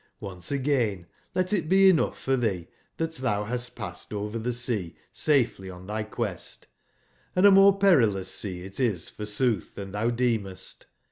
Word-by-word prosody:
Once 90 0 -7
again 125 -10 0 0.3
let 185 +1 +1
it 170 -6 0
be 195 +1 +6
enougb 160 - 0
for 135 - 0
tbee 100 -9 -1 0.3
tbat 160 -3 -3
tbou 105 -5 0
bast 125 +1 -2
passed - - -7
over 105 +2 -3
tbe 120 +3 -2
sea 115 -8 -1 0.2
safely 125 -10 +1
on 90 0 -10
tby 110 +1 -4
quest; 105 -8 -4 0.7
and 185 +2 +4
a 200 - +9
more 195 0 +7
perilous 120 - +3
sea 90 -4 -2
it 95 +1 -7
is 110 -10 0
f 105 - -6
orsootb 105 +2 +1
tban 95 -1 -7
tbou 115 +4 -1
deemest. 110 -6 -2
115 Hz, 165 wpm, -26 LUFS, 100-135 Hz, 0.7 s, a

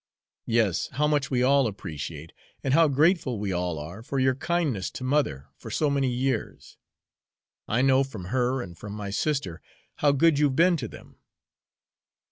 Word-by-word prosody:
"Yes, 115 -6 +1
how 150 +4 +1
much 145 -2 +1
we 125 -2 +1
all 135 0 +4
appreciate, 80 -5 -7 0.3
and 135 - 0
how 165 +1 +6
grateful 145 - +2
we 100 -1 -2
all 90 -2 -2
are 85 +8 -7
for 135 +3 -4
your 130 0 +3
kindness 140 - -1
to - - -8
mother 130 - 0
for - - -10
so 150 -2 +1
many 135 -2 +1
years. 130 +2 -3 0.9
I 120 +4 +1
know 135 0 +4
from 110 -9 -8
her 125 0 +1
and 85 -2 -10
from 100 +5 -8
my 105 -2 -5
sister 100 - -2 0.4
how 145 - +3
good 145 +1 +3
you've 145 -3 +2
been 175 +3 +4
to 125 -6 -4
them." - - -14
130 Hz, 170 wpm, -26 LUFS, 100-145 Hz, 0.9 s, how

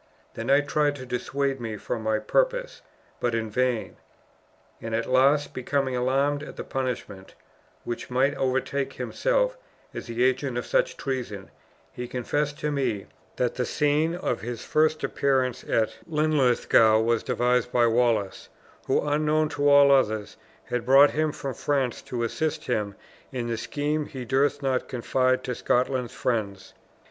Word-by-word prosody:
The 115 - -5
knight 140 +4 +3
tried 145 -1 +1
to 130 -2 -8
dissuade 135 +2 -2
me 110 -2 -4
from 110 +3 -4
my 110 0 +1
purpose, - - 0 0.4
but 120 -1 0
in 110 -1 -2
vain, 125 0 -1 0.8
and 115 0 -3
at 115 - -1
last, 140 +3 +3
becoming 130 0 -1
alarmed 135 +3 +1
at 150 - -9
the - - -5
punishment 120 -7 -5 0.5
which 120 - -5
might 130 +3 +2
overtake 135 +1 -1
himself - - 0 0.4
as - - -7
the 120 +1 -1
agent 130 0 +1
of 120 - -3
such - - +1
treason, 120 -8 -4 0.4
he 125 0 -6
confessed 145 +4 -2
to 150 - -1
me 125 -8 -1 0.3
that 125 -1 0
the 125 - -1
scene 150 +5 +1
of 180 - -2
his 120 0 -6
first 155 0 +2
appearance 130 -3 0
at 110 -1 0
Linlithgow 135 -8 +3
was 115 0 +1
devised 125 -1 +1
by 120 -1 +4
Wallace, 115 -4 +1 0.4
who, - - +1
unknown 155 +1 +2
to 145 -1 +1
all 140 0 +7
others, 110 -6 +2 0.3
had 125 -1 -3
brought 135 +4 +6
him 155 0 0
from 135 -2 -5
France 135 -1 -1
to 120 -2 -4
assist 155 +7 -2
him 105 -5 -1 0.4
in 125 -3 -3
the 120 -1 -2
scheme 150 +5 -2
he 130 -2 -7
durst 140 +3 +1
not 130 -2 0
confide 130 +1 0
to 125 - -3
Scotland's 125 0 0
friends. 105 -6 -2
130 Hz, 155 wpm, -26 LUFS, 120-145 Hz, 0.8 s, all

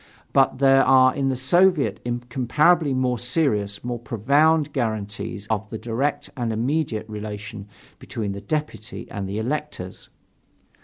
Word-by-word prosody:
But 135 -1 +3
there 135 0 +5
are 130 -1 +5
in 135 -1 0
the 130 - 0
Soviet 140 - +3
incomparably 130 +7 +1
more 130 -2 0
serious, 110 -7 -1
more 120 -1 -3
profound 140 +7 +2
guarantees 105 -4 -3
of 110 -1 -2
the 110 - -5
direct 120 +6 -2
and 120 -3 -2
immediate 115 -1 -1
relation 105 -1 -7 0.3
between 105 -3 -4
the 100 0 -6
deputy 150 -3 -4
and 100 -2 -4
the 100 - -3
electors. 125 -6 -4
120 Hz, 135 wpm, -23 LUFS, 110-140 Hz, 0.3 s, there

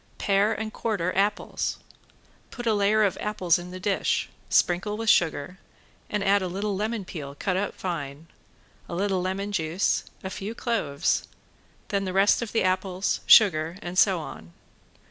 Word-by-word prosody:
Pare 200 +2 +2
and 220 -1 -4
quarter 190 -6 -2
apples. 205 +2 0 0.7
Put 240 - -7
a 225 - +3
layer 210 +1 +3
of 200 - 0
apples 185 -5 +1
in 175 +1 -8
the 185 +1 -8
dish, 195 +1 0 0.2
sprinkle 190 +4 +2
with 225 -1 +3
sugar, 170 +2 0 0.5
and 210 -1 -1
add 200 +1 +3
a 185 - -2
little 200 +3 -2
lemon 215 0 -2
peel, 140 -6 -7
cut 185 +4 -1
up 200 +2 -2
fine, 150 -4 -5 0.6
a - - -4
little 190 0 0
lemon 195 +2 -2
juice, 170 -1 0 0.2
a 190 - -5
few 205 +4 -5
cloves; 190 - -1 0.6
then 200 -1 0
the 185 - -3
rest 195 +4 +4
of 235 - -4
the 225 - +1
apples, 185 0 0
sugar 170 -5 +6
and 175 +1 -5
so 190 0 +4
on. 85 - -9
195 Hz, 165 wpm, -26 LUFS, 180-210 Hz, 0.7 s, sugar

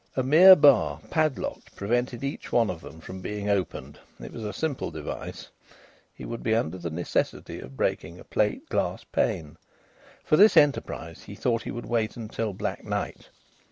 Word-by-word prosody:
A 130 - +2
mere 170 +8 +9
bar, 105 - +4
padlocked, 155 -4 -1
prevented 120 +4 -1
each 140 +1 -5
one 115 -2 +3
of 85 -3 -8
them 80 - -12
from 95 +3 -8
being 105 +1 -3
opened; 80 -7 -3 0.2
it - - -9
was 115 - -7
a 105 - -3
simple 145 +6 -3
device. 75 -2 -7 0.6
He - - -10
would 115 0 -6
be 110 - +1
under 95 -5 -1
the 85 -1 -4
necessity 85 +2 -2
of 65 +2 -11
breaking - - -2
a - - -11
plate - - -1
glass - - -1
pane. 75 -2 -2 0.7
For 155 - +3
this 210 +3 +7
enterprise 145 -2 +1
he - - -9
thought 115 -2 0
he - - -6
would 120 - -6
wait 115 -2 -1
until 110 -1 -3
black 95 - -4
night. - - -4
110 Hz, 175 wpm, -26 LUFS, 90-130 Hz, 0.7 s, mere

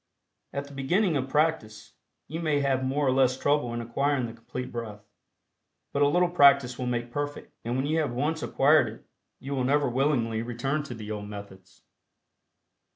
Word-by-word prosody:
At 140 0 -4
the 140 - -13
beginning 170 +7 +1
of 135 -1 -1
practice, 135 -8 -1 0.3
you 160 +3 -5
may 155 -4 +1
have 135 -2 +1
more 140 +3 0
or 130 - +3
less 130 -1 +3
trouble 145 -3 +1
in 120 0 -3
acquiring 130 +3 0
the 115 - -7
Complete 125 +2 -7
Breath, 105 -3 -7 0.9
but 140 - 0
a 145 - +6
little 180 +4 +3
practice 140 -6 +5
will 125 - -2
make 120 -1 -2
perfect, 145 +2 -5
and 120 +2 -2
when 130 - 0
you 155 +2 +1
have 150 -5 0
once 150 +6 -1
acquired 150 +3 +4
it - - -14 0.3
you 140 +1 -5
will 130 -2 0
never 140 +2 +2
willingly 120 -3 +1
return 120 +5 -2
to 125 - -7
the 110 -1 -7
old 105 -1 -5
methods. 95 -2 -11
135 Hz, 185 wpm, -27 LUFS, 120-145 Hz, 0.9 s, a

